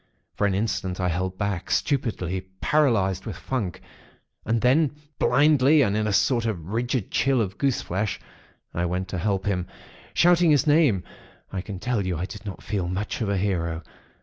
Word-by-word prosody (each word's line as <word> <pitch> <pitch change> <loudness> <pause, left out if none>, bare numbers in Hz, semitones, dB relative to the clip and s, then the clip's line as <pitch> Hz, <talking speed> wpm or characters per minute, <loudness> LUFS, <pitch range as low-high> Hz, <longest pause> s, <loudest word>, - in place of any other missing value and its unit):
For 105 - +1
an 95 - 0
instant, 95 -3 -2
I 90 -1 +1
held 90 +2 -2
back, 100 -3 -2
stupidly, 105 - 0 0.2
paralysed 115 -11 +2
with 105 - -4
funk; 95 -1 -3 0.7
and 115 0 +1
then, 140 +4 +3 0.2
blindly, 145 0 +5
and 100 -4 +1
in 110 0 0
a - - 0
sort 115 +2 +2
of 90 -6 -4
rigid 120 0 -1
chill 135 0 +2
of 100 -3 -2
goose 135 -3 +1
flesh, 95 +3 -2 0.5
I 85 - -1
went 90 +2 -2
to 90 - -3
help 95 0 0
him, 90 -3 -1 0.5
shouting 175 0 +5
his 145 -2 +4
name. 145 - +4 0.5
I 95 - -2
can 100 0 -7
tell 115 +1 -1
you, 90 -3 -2
I 85 - -2
did 105 +2 -9
not 100 - -7
feel 95 -5 -2
much 95 +6 -3
of 105 - 0
a 100 - +1
hero. 85 -4 -1
100 Hz, 180 wpm, -25 LUFS, 95-125 Hz, 0.7 s, blindly